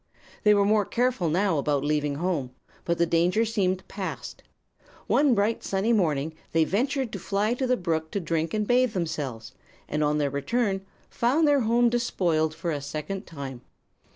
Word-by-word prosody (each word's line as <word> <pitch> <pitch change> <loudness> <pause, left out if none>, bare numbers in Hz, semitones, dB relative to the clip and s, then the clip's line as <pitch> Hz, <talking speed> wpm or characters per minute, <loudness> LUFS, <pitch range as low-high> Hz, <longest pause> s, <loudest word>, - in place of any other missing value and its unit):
"They 210 -1 +5
were 200 -1 +3
more 210 0 +3
careful 240 -5 0
now 175 -1 +1
about 140 -1 0
leaving 150 -1 0
home; 160 -5 -1 0.4
but 170 0 0
the 170 - +3
danger 175 +6 +2
seemed 190 -4 -1
past. 195 -2 -6 0.6
One 280 -4 +3
bright, 210 +2 0
sunny 200 +4 +1
morning 160 -7 +1 0.2
they 165 0 +4
ventured 255 - 0
to - - -5
fly 210 +3 0
to 255 +1 -1
the 250 0 +2
brook 160 -3 -2
to 200 - 0
drink 165 -2 -1
and 210 0 0
bathe 245 0 +3
themselves, 150 - -3 0.4
and 150 0 -1
on 150 0 +2
their 145 -2 0
return 195 - 0 0.3
found 280 +7 +2
their 290 -1 +4
home 235 +1 +3
despoiled 175 -10 0
for 170 - -3
a 145 -2 -3
second 155 +7 -5
time. 135 -6 -7
185 Hz, 175 wpm, -26 LUFS, 155-225 Hz, 0.6 s, They